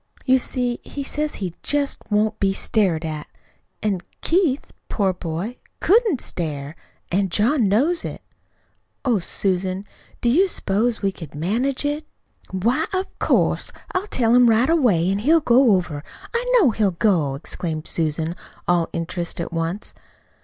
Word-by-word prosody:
You 260 0 +5
see 245 -1 -2
he 280 - -5
says 300 +2 -2
he 185 -4 -4
just 290 -1 0
won't 215 +1 +1
be 195 -1 +2
stared 185 -6 +1
at; 155 -2 -5 0.6
an' 200 -4 0 0.2
Keith, 325 -6 +2 0.2
poor 195 -3 +1
boy, 180 +7 -4 0.2
COULDN'T 420 - +3
stare, 150 -6 -4 0.4
an' 190 +2 +1
John 225 - +3
knows 290 - +2
it. - - -6 0.8
Oh, 240 -6 +3
Susan, 185 +1 -1 0.3
do - - -1
you 340 +12 +5
suppose 220 - 0
we 195 - +2
could 165 -6 -10
manage 240 - 0
it?" 295 +2 -1 0.5
"Why, 235 - 0
of 375 0 -3
course. - - +2 0.2
I'll 370 +3 -1
tell 235 - +2
him 245 -1 +6
right 230 +7 +4
away, 225 - +3
an' 195 +1 +1
he'll 310 +9 +4
go 250 -5 +5
over; 165 -6 -1 0.3
I - - 0
know 330 - +5
he'll 210 -2 +2
go!" 170 -7 +1
exclaimed 155 +2 -4
Susan, 160 +1 0 0.3
all 175 -2 +2
interest 170 +1 -3
at 170 - -4
once. 165 +5 -3
210 Hz, 150 wpm, -22 LUFS, 175-265 Hz, 0.8 s, him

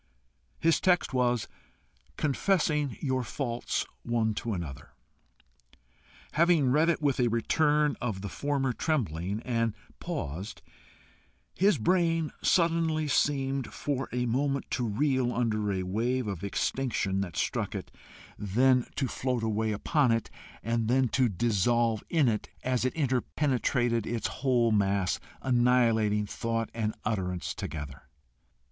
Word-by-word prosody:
His 165 0 +3
text 180 -5 +2
was 125 -3 +1 0.7
"Confessing 150 - +1
your 130 -2 0
faults 120 -1 -2 0.2
one 115 -2 0
to 115 +1 -3
another." 85 -8 -6 1.4
Having 160 -5 +3
read 155 +5 +4
it 155 -2 0
with 140 -3 +1
a 125 - +3
return 150 +6 +2
of 110 -6 -2
the 100 - -4
former 135 +2 -1
trembling, 100 - -1
and 115 -3 0 0.2
paused, 90 +10 -5 0.9
his 195 -2 +3
brain 165 +3 +1
suddenly 165 -3 +2
seemed 135 -3 0
for 135 -2 -3
a 125 0 -1
moment 135 +3 -1
to 125 -2 0
reel 130 +2 +1
under 110 -4 0
a 95 -1 -1
wave 120 +7 -1
of 100 -3 -4
extinction 100 -2 -1
that 90 -6 -5
struck - - -1
it, - - -6 0.5
then 125 +5 +3
to 135 - 0
float 125 -2 -2
away 110 0 0
upon 130 +5 +2
it, 115 0 -1 0.3
and 115 0 0
then 130 +1 +3
to 130 -1 +2
dissolve 115 +2 +1
in 160 -6 +3
it, 110 -2 -1
as 125 -1 0
it 130 - -1
interpenetrated 125 -4 0
its 115 -1 -2
whole 125 -4 +1
mass, 100 -2 +1 0.2
annihilating 120 -4 +3
thought 115 +2 -2
and 110 -1 -2
utterance 90 -5 -2
together. 75 -4 -6
120 Hz, 125 wpm, -29 LUFS, 110-140 Hz, 1.4 s, read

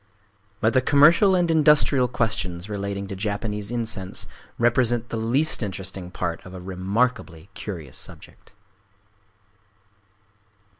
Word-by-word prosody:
But 110 +1 +2
the 130 - +4
commercial 160 - +5
and 175 -2 +2
industrial 150 -4 +4
questions 105 -7 -2
relating 100 -1 -4
to 95 - -6
Japanese 105 +1 -3
incense 110 -5 -2 0.3
represent 120 0 +2
the - - -4
least 125 +9 +2
interesting 95 -3 -5
part 90 -2 -4
of 90 0 -11
a - - -7
remarkably 95 - -2
curious 80 -13 -7
subject. - - -9
110 Hz, 110 wpm, -24 LUFS, 95-125 Hz, 0.3 s, commercial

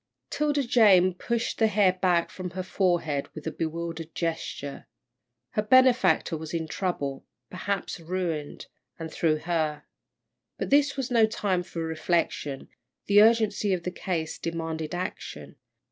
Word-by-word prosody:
'Tilda 295 -1 +1
Jane 195 -6 +5
pushed 235 +6 -2
the 220 - +5
hair 200 -3 +3
back 180 -2 +1
from 185 -1 -6
her 185 +2 -5
forehead 175 -7 0
with 155 - -8
a 160 - -2
bewildered 165 0 -4
gesture. 165 -4 -4 0.6
Her 210 - 0
benefactor 235 -8 +4
was 160 +1 -6
in 160 -1 -2
trouble 145 -8 -3 0.2
perhaps 190 0 -3
ruined, 165 -3 -3 0.3
and 160 -1 -7
through 155 -2 +2
her. 160 -3 -1 0.7
But - - -4
this 285 0 +4
was 265 -1 -3
no 230 -2 +5
time 195 -4 -1
for 170 -2 -5
reflection, 160 -3 -1 0.4
the 205 0 +6
urgency 215 -3 +3
of 175 - -7
the 180 - -3
case 170 -3 -3
demanded 165 0 -4
action. 185 +2 -6
180 Hz, 140 wpm, -27 LUFS, 160-205 Hz, 0.7 s, the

